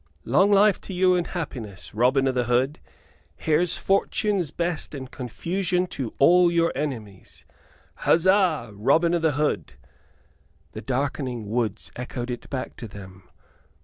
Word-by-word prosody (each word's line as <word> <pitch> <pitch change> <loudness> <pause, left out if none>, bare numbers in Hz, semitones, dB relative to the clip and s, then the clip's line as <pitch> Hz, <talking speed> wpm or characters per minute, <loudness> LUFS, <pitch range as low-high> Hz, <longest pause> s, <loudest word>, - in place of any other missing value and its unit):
"Long 185 - +4
life 200 0 +4
to 190 - -7
you 185 0 +4
and 175 -1 0
happiness, 120 - -6
Robin 130 +5 +3
o' - - +3
th' 125 -2 -1
Hood! 130 +5 +1 0.6
Here's 160 +2 +1
fortune's 195 -2 0
best 170 -1 -3
and 130 -2 -8
confusion 180 - -2
to 125 -5 -5
all 175 +4 +5
your 170 0 +2
enemies! 115 -10 -6 0.5
Huzza, 175 - +3
Robin 160 +12 +2
o' 175 - +2
th' 160 -4 +1
Hood!" 105 - -1 1.0
The - - -7
darkening 130 -4 -3
woods 105 -9 -2
echoed 125 0 -5
it 120 - -7
back 130 -2 -4
to 115 - -7
them. 95 -3 -12
140 Hz, 140 wpm, -24 LUFS, 120-175 Hz, 1.0 s, all